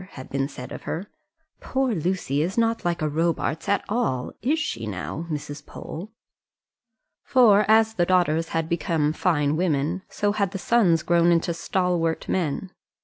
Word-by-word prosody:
had 130 Hz, -, -10 dB
been 135 Hz, 0 st, 0 dB
said 125 Hz, -3 st, -9 dB
of -, -, -7 dB
her; 185 Hz, +5 st, -5 dB, 0.5 s
"poor 265 Hz, -2 st, 0 dB
Lucy 170 Hz, -5 st, -1 dB
is 180 Hz, +7 st, -2 dB
not 230 Hz, 0 st, +1 dB
like 170 Hz, -2 st, -1 dB
a -, -, +2 dB
Robarts 165 Hz, +2 st, -1 dB
at 200 Hz, -1 st, +1 dB
all; 205 Hz, -, -1 dB
is 290 Hz, +6 st, +1 dB
she, 200 Hz, -, -3 dB
now, 105 Hz, -, -5 dB
Mrs. 145 Hz, -1 st, -5 dB
Pole?" 185 Hz, +7 st, -8 dB, 1.1 s
for 215 Hz, -5 st, +5 dB
as 220 Hz, 0 st, +5 dB
the 175 Hz, -5 st, +1 dB
daughters 165 Hz, -3 st, +2 dB
had 165 Hz, -1 st, -1 dB
become 160 Hz, -3 st, 0 dB
fine 150 Hz, -4 st, +1 dB
women, 165 Hz, +1 st, 0 dB
so 205 Hz, 0 st, 0 dB
had 200 Hz, -2 st, -1 dB
the -, -, -2 dB
sons 185 Hz, -6 st, +3 dB
grown 170 Hz, 0 st, +4 dB
into 170 Hz, 0 st, +2 dB
stalwart 170 Hz, -2 st, -1 dB
men. 180 Hz, +1 st, -1 dB
170 Hz, 160 wpm, -24 LUFS, 155-200 Hz, 1.1 s, for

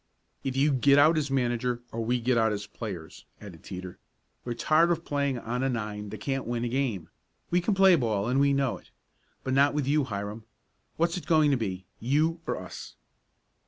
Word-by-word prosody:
"Either 135 Hz, -1 st, -2 dB
you 145 Hz, +2 st, +4 dB
get 140 Hz, +1 st, +4 dB
out 155 Hz, +3 st, +6 dB
as 150 Hz, -2 st, 0 dB
manager 125 Hz, -2 st, 0 dB
or 115 Hz, 0 st, -3 dB
we 120 Hz, +2 st, 0 dB
get 125 Hz, +2 st, +1 dB
out 110 Hz, -1 st, +3 dB
as 105 Hz, -1 st, -3 dB
players," 95 Hz, -8 st, -8 dB
added 90 Hz, -7 st, -11 dB
Teeter. 90 Hz, -1 st, -8 dB, 0.4 s
"We're 120 Hz, -1 st, -4 dB
tired 155 Hz, +7 st, +3 dB
of 170 Hz, -1 st, -1 dB
playing 140 Hz, -2 st, 0 dB
on 120 Hz, +2 st, -3 dB
a 135 Hz, -, +1 dB
nine 105 Hz, -3 st, -4 dB
that 105 Hz, 0 st, -7 dB
can't 135 Hz, -1 st, -2 dB
win 120 Hz, 0 st, -2 dB
a -, -, -1 dB
game. 120 Hz, -10 st, -2 dB, 0.4 s
We 175 Hz, +1 st, +3 dB
can 200 Hz, +3 st, 0 dB
play 190 Hz, -1 st, +7 dB
ball, 110 Hz, -7 st, 0 dB
and 130 Hz, +3 st, +2 dB
we 140 Hz, 0 st, +4 dB
know 135 Hz, -3 st, 0 dB
it. -, -, -23 dB, 0.5 s
But 130 Hz, -, -2 dB
not 140 Hz, +2 st, +4 dB
with 150 Hz, -3 st, 0 dB
you, 145 Hz, 0 st, +2 dB
Hiram. 105 Hz, -1 st, -5 dB, 0.5 s
What's 170 Hz, +2 st, +1 dB
it 180 Hz, -, -8 dB
going 155 Hz, -3 st, +4 dB
to -, -, +4 dB
be 95 Hz, -5 st, -4 dB
you 155 Hz, +7 st, +1 dB
or -, -, -1 dB
us?" 90 Hz, 0 st, -9 dB
125 Hz, 205 wpm, -28 LUFS, 110-145 Hz, 0.5 s, play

